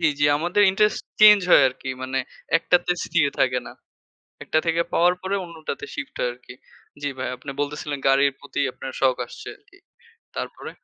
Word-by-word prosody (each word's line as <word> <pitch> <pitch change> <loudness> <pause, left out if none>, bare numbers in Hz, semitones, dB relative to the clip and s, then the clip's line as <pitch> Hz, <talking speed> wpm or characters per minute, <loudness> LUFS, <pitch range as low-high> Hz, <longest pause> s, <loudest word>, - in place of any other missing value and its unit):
জি, 165 - +3
জি 145 - +2
আমাদের 175 +6 +1
interest 210 +2 +1 0.2
change 210 -1 +9
হয় 145 - +8
আরকি। 130 +1 -7
মানে 130 +1 -2 0.4
একটাতে 180 +1 +1
স্থির - - +2
থাকে 125 -1 +2
না। - - -9 0.7
একটা 155 - +1
থেকে 165 +1 +1
পাওয়ার 175 +1 +4
পরে 190 +1 -2
অন্যটাতে 170 - -7
শিফট 290 -2 -6
হয় 125 - 0
আরকি। 125 +1 -14 0.5
জি 145 - -1
ভাই 130 - -3
আপনি 135 +3 -9
বলতেছিলেন 145 0 -3
গাড়ির 135 +1 +4
প্রতি 145 0 -5
আপনার 130 - -8
শখ 130 -2 +3
আসছে - - -10
আরকি। 400 0 -24 0.6
তারপরে? - - -6
150 Hz, 170 wpm, -23 LUFS, 135-185 Hz, 0.7 s, change